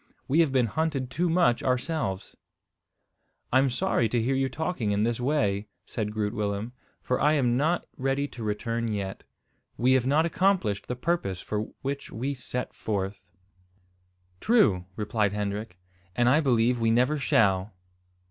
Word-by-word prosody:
We 150 +5 +2
have 160 -5 +4
been 130 -2 +3
hunted 135 0 -2
too 170 +7 0
much 165 -8 +3
ourselves." 125 - -2 1.2
"I'm 130 +1 +5
sorry 125 -4 +1
to 120 - +1
hear 120 +4 +1
you 135 0 +1
talking 160 -8 -2
in 100 +1 +1
this 115 +1 0
way," 110 -7 0 0.2
said 105 -2 -3
Groot 105 0 -2
Willem, 105 +2 -2 0.3
"for 125 - 0
I 150 - +4
am 125 -5 +2
not 160 +6 +1
ready 135 +2 0
to 125 - -10
return 115 +2 -2
yet. 100 -3 -3 0.6
We 125 +2 +3
have 130 -1 +2
not 150 +4 +3
accomplished 175 - +1
the 125 - -2
purpose 125 - -1
for 105 +3 -3 0.2
which 140 +1 -4
we 130 +5 -2
set 125 -1 -4
forth." 95 -3 -4 1.1
"True," 110 - +3
replied 105 -1 0
Hendrik, 105 -1 -3 0.4
"and 120 0 +3
I 135 +5 +5
believe 125 -4 +2
we 115 0 +2
never 125 +6 +2
shall." 100 -5 +2
120 Hz, 155 wpm, -27 LUFS, 105-140 Hz, 1.2 s, I'm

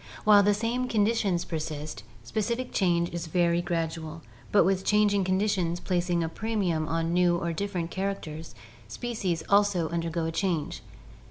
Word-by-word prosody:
While 210 -1 +7
the 205 0 +3
same 235 +4 -1
conditions 210 -5 +1
persist, 155 - -5 0.2
specific 235 - -2
change 170 -3 +1
is 170 -1 -4
very 170 +1 +2
gradual, 165 -2 -3 0.3
but 205 - +6
with 190 0 +1
changing 205 -1 +3
conditions 185 -2 0
plac 180 -1 -1
ing 170 -1 +2
a - - -1
premium 180 -5 -1
on 165 +1 -1
new 175 -1 +3
or 170 0 -2
different 175 -2 -3
characters, 175 -5 -4 0.3
species 185 - -3
also 200 -5 +3
undergo 170 0 -2
a 165 - -1
change. 165 -3 -2
175 Hz, 150 wpm, -27 LUFS, 165-205 Hz, 0.3 s, While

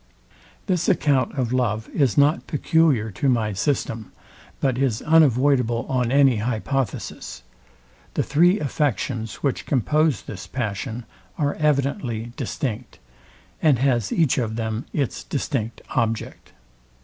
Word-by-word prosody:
This 180 -3 0
account 145 -7 +2
of 125 -2 -1
love 110 -4 0
is 135 -8 +1
not 145 +3 +3
peculiar 150 -7 +2
to 135 +8 0
my 110 -4 +1
system, 115 -1 -2 0.5
but 130 -2 0
is 125 -5 0
unavoidable 135 -6 +3
on 125 -2 0
any 135 -3 +5
hypothesis. 120 - -3 0.7
The - - +1
three 175 +7 +3
affections, 125 - -2
which 140 -3 -1
compose 145 - +1
this 95 -3 -8
passion, 110 -1 -4 0.3
are 145 -2 0
evidently 140 - -1
distinct, 125 -3 -4 0.6
and 150 -5 +4
has 120 -4 +1
each 160 -6 +2
of 110 -3 -2
them 110 +3 -3
its 140 -5 -2
distinct 125 -5 -3
object. 115 -2 -2
130 Hz, 120 wpm, -23 LUFS, 115-145 Hz, 0.7 s, any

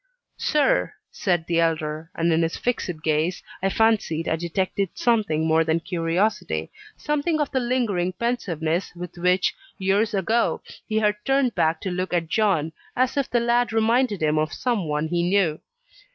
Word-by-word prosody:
"Sir," 300 +12 +2 0.2
said 175 -5 0
the 170 0 +1
elder, 160 -1 -1
and 165 0 +2
in 160 - +2
his 165 0 -1
fixed 180 -10 -2
gaze 155 +3 0 0.2
I 195 - +2
fancied 210 -7 +1
I 160 - +1
detected 185 +3 -1
something 205 -10 +1
more 160 0 +3
than 160 +1 +1
curiosity 165 - -1 0.3
something 300 +2 0
of 295 - -1
the 260 - +1
lingering 230 -8 0
pensiveness 180 -7 -2
with 175 0 -7
which, 180 +1 +2 0.2
years 205 +3 +1
ago, 220 +4 +1 0.2
he 220 - -1
had 210 -1 +2
turned 270 -3 +2
back 160 0 +1
to 190 - -3
look 180 +1 -3
at 170 -2 0
John 190 -8 +1 0.2
as 255 +1 +1
if 280 -2 0
the 240 - +2
lad 235 +1 +2
reminded 225 -3 +2
him 155 0 +2
of 155 -1 -1
some 230 -9 -1
one 150 +1 -1
he 170 +1 0
knew. 175 -3 +2
185 Hz, 165 wpm, -24 LUFS, 165-230 Hz, 0.3 s, more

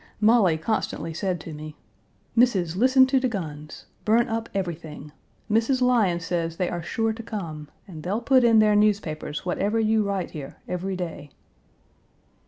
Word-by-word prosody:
Molly 210 -6 +4
constantly 165 -2 -2
said 180 +1 -2
to 160 - -8
me, 150 0 -8 0.6
"Missis, 195 -9 +3
listen 260 +5 +5
to 265 0 +2
de 255 - +1
guns. 155 -9 -6 0.2
Burn 230 +3 +3
up 225 0 -3
everything. 165 -5 -5 0.4
Mrs. 230 +4 +2
Lyons 215 -10 +2
says 165 -1 -2
they 180 - -1
are 175 - -3
sure 225 +6 -1
to 225 - -8
come, 170 -10 -6 0.2
and 165 -5 -9
they'll 195 +7 -1
put 260 +1 +4
in 230 -2 +5
their 215 -1 +5
newspapers 190 -8 0
whatever 200 +5 0
you 220 0 +2
write 200 -3 -2
here, 145 -4 -8
every 185 +2 -3
day." 165 -5 -6
195 Hz, 160 wpm, -25 LUFS, 165-225 Hz, 0.6 s, listen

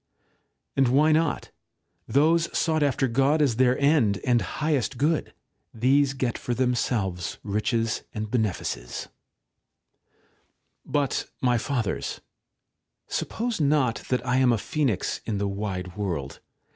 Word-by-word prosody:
And 135 -1 +4
why 145 +5 +4
not? 155 -1 +1 0.6
Those 165 +4 +3
sought 160 -2 +1
after 135 -2 +2
God 135 +6 +2
as 135 -7 +2
their 130 0 +4
end 140 -9 +3
and 120 -3 +3
highest 150 -6 -1
good; 150 +4 +1 0.4
these 135 +4 +3
get 130 -3 -1
for 120 - -2
themselves 115 -8 -1
riches 110 +2 0
and 110 -1 -4
benefices^ 105 - -1
§ - - -5
8. - - -24 1.8
But, 145 -3 -1
my 125 -2 +2
Fathers, 115 -6 -2 0.9
suppose 235 -5 -2
not 140 -5 +2
that 125 -1 0
I 125 0 +1
am 130 -2 +4
a 115 - +2
phoenix 130 - -1
in 110 -3 -1
the 100 0 -1
wide 95 -3 -4
world. 85 -10 -3
125 Hz, 130 wpm, -26 LUFS, 110-145 Hz, 1.8 s, And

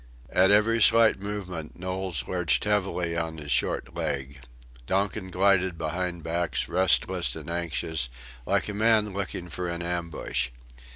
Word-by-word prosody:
At 95 +1 +5
every 110 +3 +4
slight 115 -1 +6
movement 95 -6 -6
Knowles 90 -7 -2
lurched 90 -2 +1
heavily 95 -5 0
on 80 -1 -3
his 75 -2 -6
short - - +1
leg. 70 -1 -3 0.5
Donkin 95 -1 -1
glided 95 -1 +2
behind 85 +2 -3
backs, 85 +2 -1
restless 90 -4 +1
and - - -8
anxious, 80 -5 -1 0.4
like - - +1
a 105 - -4
man 110 -1 +3
looking 95 -2 -4
for 90 +1 -4
an 85 0 -4
ambush. 85 -7 -2
90 Hz, 135 wpm, -27 LUFS, 85-100 Hz, 0.5 s, slight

